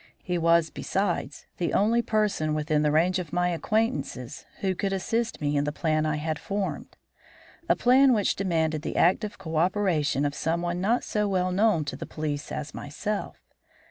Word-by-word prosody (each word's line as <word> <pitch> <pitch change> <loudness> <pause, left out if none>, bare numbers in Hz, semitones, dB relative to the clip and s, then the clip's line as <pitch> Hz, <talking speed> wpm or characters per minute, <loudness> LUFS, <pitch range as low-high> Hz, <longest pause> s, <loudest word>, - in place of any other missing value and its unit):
He 180 -2 -1
was, 165 -1 +3
besides, 195 +2 -2
the 175 - -1
only 225 +4 +3
person 210 -9 0
within 150 0 +1
the 150 - +2
range 175 +5 +2
of 170 -5 -6
my 180 +1 +1
acquaintances 175 - -2
who 190 -1 +1
could 195 +2 -2
assist 225 +4 -1
me 145 -1 -1
in 145 - +2
the 150 - -1
plan 155 0 0
I 155 - 0
had 155 0 -3
formed; 200 +3 -4 0.7
a - - +5
plan 260 +2 +5
which 210 -5 +2
demanded 160 -5 0
the - - -4
active 205 +4 +2
cooperation 165 -4 +1
of 145 - -1
someone 175 +3 -1
not 230 +6 +1
so 210 -1 0
well 185 -2 0
known 195 -4 +2
to 140 - -4
the - - -7
police 150 -2 -4
as 150 -1 -5
myself. 200 +8 -4
175 Hz, 175 wpm, -26 LUFS, 155-205 Hz, 0.7 s, a